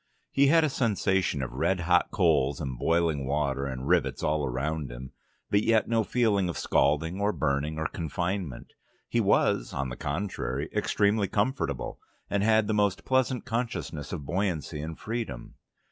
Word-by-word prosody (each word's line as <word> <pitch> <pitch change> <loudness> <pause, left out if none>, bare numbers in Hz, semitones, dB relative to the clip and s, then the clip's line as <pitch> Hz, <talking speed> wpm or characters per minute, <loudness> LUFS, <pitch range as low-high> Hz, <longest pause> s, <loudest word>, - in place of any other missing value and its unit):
He 140 0 +4
had 165 +3 +5
a 155 - +2
sensation 95 - +1
of 65 - -5
red 95 -2 0
hot 90 0 +3
coals 75 -7 +2
and 65 -4 -3
boiling 80 -4 +1
water 70 -1 0
and 65 0 -5
rivets - - +1
all 75 0 +1
around 70 +2 -2
him, 65 +2 -8 0.4
but 100 - +4
yet 110 0 +3
no 115 -1 +2
feeling 105 -6 +1
of 85 - -4
scalding 80 +7 +1
or 105 +1 +2
burning 75 -2 -1
or 80 - -2
confinement. 85 -1 -4 0.3
He - - +1
was, - - +2
on 70 -1 -2
the 60 - -5
contrary, 75 -3 -3
extremely 105 -1 +2
comfortable, 105 - -1 0.3
and 100 - +1
had 110 +1 +4
the 110 - -1
most 100 -2 +1
pleasant 130 -1 +1
consciousness 115 - -3
of 75 -6 -5
buoyancy 85 -4 -2
and 80 +1 -6
freedom. 110 - -5
85 Hz, 160 wpm, -28 LUFS, 70-105 Hz, 0.4 s, had